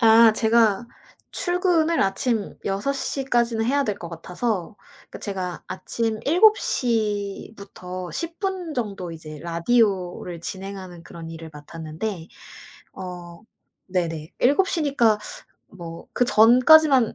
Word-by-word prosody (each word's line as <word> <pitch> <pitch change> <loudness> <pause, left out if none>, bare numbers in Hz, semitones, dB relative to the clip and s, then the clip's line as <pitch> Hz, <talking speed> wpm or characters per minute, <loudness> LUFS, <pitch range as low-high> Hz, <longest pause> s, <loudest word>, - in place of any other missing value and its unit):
아 225 -1 +7
제가 220 -1 +3 0.4
출근을 350 -3 +1
아침 210 +2 -1
6:00 270 +7 -1
까지는 235 -3 +1
해야 280 +3 +2
될 210 -4 -2
것 170 - -7
같아서 180 +4 -3 0.3
그러니까 - - -9
제가 185 -3 -4
아침 225 +3 -2
7:00 230 - +2
부터 185 -2 -8
10 335 0 -4
분 375 -5 -3
정도 195 - -4
이제 155 -2 -9
라디오를 180 -1 0
진행하는 190 -1 -7
그런 165 -1 -10
일을 165 0 -9
맡았는데 160 +4 -6 0.7
어 175 -2 -8 0.5
네네 165 -3 -2
7:00 330 +6 +3
니까 235 -7 +3 0.5
뭐 170 -3 -10
그 245 - +2
전까지만 255 +3 +6
210 Hz, 210 characters per minute, -23 LUFS, 175-250 Hz, 0.7 s, 아